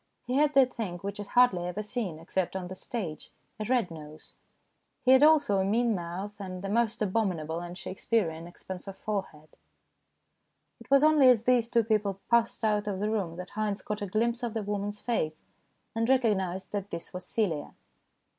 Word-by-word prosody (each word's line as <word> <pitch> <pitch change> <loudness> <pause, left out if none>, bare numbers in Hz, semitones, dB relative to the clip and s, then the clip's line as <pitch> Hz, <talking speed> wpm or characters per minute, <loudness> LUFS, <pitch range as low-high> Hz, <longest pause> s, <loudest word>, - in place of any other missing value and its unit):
He 250 - -3
had 290 +1 +3
that 260 -2 +5
thing 195 -7 -4
which 200 +1 -4
is 205 - -5
hardly 200 -9 +4
ever 195 +4 -3
seen, 210 -7 -3
except 175 +3 -2
on 180 -2 -4
the - - -5
stage 185 -6 -6 0.3
a 215 - -2
red 240 -6 +1
nose. 155 -1 -11 0.7
He 255 - +5
had 260 +1 +7
also 295 -10 +5
a - - +2
mean 230 +4 +2
mouth, 185 +3 -4
and 185 0 -6
a - - -3
most 230 +1 +1
abominable 185 -6 -1
and 175 +1 -7
Shakes 185 - -8
pearean 170 -8 0
expanse 180 +2 -9
of 195 - -7
forehead. 190 -8 -4 1.3
It - - -15
was 275 +1 +5
only 305 -4 +6
as 235 -3 +4
these 240 -2 +3
two 235 -1 +3
people 210 -3 0
passed 235 0 +2
out 210 -1 +1
of 195 -2 -2
the 210 +2 0
room 190 -7 -1
that 180 +1 -8
Haynes 210 -1 -2
caught 210 0 -4
a 205 - -2
glimpse 230 +5 0
of 235 -2 -3
the 220 - -1
woman's 205 0 -3
face, 155 -10 -2 0.5
and 230 +1 0
recognized 195 -8 +1
that 205 -1 -3
this 170 - -7
was 180 0 -6
Celia. 180 -7 -2
205 Hz, 195 wpm, -29 LUFS, 180-230 Hz, 1.3 s, had